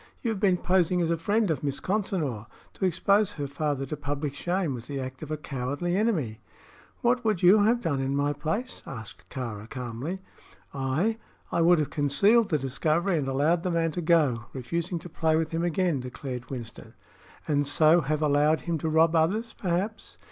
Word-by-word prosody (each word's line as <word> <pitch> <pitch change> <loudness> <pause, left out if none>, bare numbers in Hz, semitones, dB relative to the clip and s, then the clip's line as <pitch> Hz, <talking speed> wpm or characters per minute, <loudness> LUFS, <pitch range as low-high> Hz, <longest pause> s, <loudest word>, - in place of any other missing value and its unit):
You 235 - 0
have 210 - -3
been 190 -2 +3
posing 180 -1 +2
as 165 - 0
a - - +3
friend 205 +3 +1
of 150 -3 -2
Miss 140 -1 -2
Consinor. 170 - -2 0.3
To 190 - -2
expose 200 +3 +2
her 145 -5 -4
father 140 0 -2
to 145 - -4
public 145 0 -3
shame 175 0 -1
was 120 -1 -7
the 140 -1 -4
act 130 0 -6
of 155 - -7
a 155 - -2
cowardly 145 +5 -3
enemy." 165 - 0 0.6
"What 245 +1 +2
would 215 -6 0
you 190 +4 +7
have 235 +2 +3
done 145 - -1
in 135 +1 -1
my 145 +1 +1
place?" 160 - -3
asked 110 -5 -9
Kāra, 115 -4 -6
calmly. 125 +8 -5 0.5
"I? 150 +12 0 0.3
I - - +1
would 175 +1 +6
have 150 -2 -1
concealed 200 +11 +4
the 155 - +2
discovery 155 +7 0
and 135 - -2
allowed 145 +6 +2
the 180 - -2
man 165 -1 +1
to 175 - -3
go, 150 -9 +2
refusing 170 +7 -3
to 170 - -8
play 160 -1 +1
with 160 0 0
him 165 +1 -1
again," 175 -3 +1
declared 125 0 -6
Winston. 120 -4 -8 0.5
"And 145 -2 +1
so 155 +3 +5
have 150 +1 -1
allowed 150 +1 +3
him 170 -2 -2
to 160 - -1
rob 160 +1 +4
others, 205 +9 +1
perhaps?" 195 +2 -3
155 Hz, 190 wpm, -27 LUFS, 140-180 Hz, 0.6 s, you